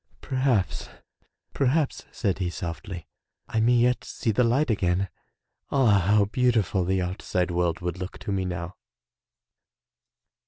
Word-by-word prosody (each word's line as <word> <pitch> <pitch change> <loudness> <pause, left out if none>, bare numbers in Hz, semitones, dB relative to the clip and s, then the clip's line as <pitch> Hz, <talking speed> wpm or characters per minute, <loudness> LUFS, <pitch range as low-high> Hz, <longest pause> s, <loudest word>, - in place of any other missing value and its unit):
"Perhaps, 130 -7 0 0.6
perhaps," 140 +2 +1
said 100 -5 -1
he 90 -2 0
softly, 85 0 -6 0.4
"I 110 - -1
may 120 +2 +4
yet 125 +1 +3
see 115 - -2
the 115 +4 +3
light 125 +4 +2
again. 95 -2 +1 0.6
Ah, 120 -8 +4
how 105 0 +5
beautiful 110 -5 +1
the 95 +1 +1
outside 90 0 -1
world 85 -1 0
would 90 0 -3
look 90 +1 -6
to - - -5
me 95 -1 0
now!" 90 0 -5
100 Hz, 130 wpm, -26 LUFS, 90-120 Hz, 0.6 s, how